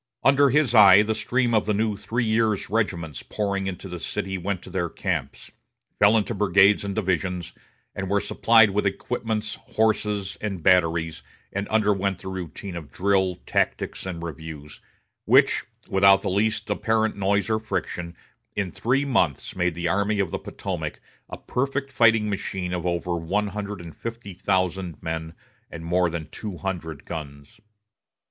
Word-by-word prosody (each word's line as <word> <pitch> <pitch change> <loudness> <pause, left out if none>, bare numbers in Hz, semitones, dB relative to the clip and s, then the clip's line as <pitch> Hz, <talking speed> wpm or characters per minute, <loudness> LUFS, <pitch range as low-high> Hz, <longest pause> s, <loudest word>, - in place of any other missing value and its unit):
Under 140 +1 +5
his 135 -2 +2
eye 105 -2 +8
the 110 +1 0
stream 120 +2 0
of 110 -2 +2
the 105 - +2
new 110 0 0
three 110 +4 -2
years' 110 -3 +1
regiments 85 - -1
pouring 100 -2 -2
into 95 +1 -5
the 90 -1 -6
city 95 +2 -3
went 95 0 -3
to - - -11
their 85 -2 -1
camps, - - -4 0.5
fell 105 +2 +6
into 110 +2 0
brigades 100 0 +4
and 100 -1 -3
divisions, 90 -3 -1 0.4
were 95 +1 0
supplied 115 0 +4
with 100 +1 +1
equipments, 110 +1 -2
horses, 105 -3 0
and 95 -6 -4
batteries, 80 -2 +2 0.3
and 100 +1 -2
underwent 100 -3 +1
the 95 - -8
routine 95 +1 -6
of 80 -4 -8
drill, 95 -1 +1
tactics, - - -1
and 85 -2 -5
reviews, 80 -2 -8 0.4
which, - - +4 0.2
without 95 0 +5
the 100 - -1
least 105 +3 0
apparent 110 +1 +1
noise 100 0 +1
or 110 -1 +1
friction, 90 -5 -4 0.4
in 95 -3 -1
three 135 +4 0
months 90 - 0
made 90 -2 0
the 85 0 -2
Army 100 +4 +1
of 95 -4 0
the - - -2
Potomac - - -5 0.3
a - - -6
perfect 135 +1 -2
fighting 110 -4 +4
machine 95 -2 -3
of 90 0 -2
over 85 0 -1
one 100 +6 -1
hundred 105 0 -5
and 85 -2 -10
fifty 115 -4 -7
thousand 95 -2 -1
men 80 0 -4 0.3
and 80 0 -8
more 90 +1 +2
than 80 -2 -5
two 105 -5 -6
hundred 85 -6 -5
guns. 70 -3 -8
100 Hz, 160 wpm, -24 LUFS, 90-110 Hz, 0.5 s, eye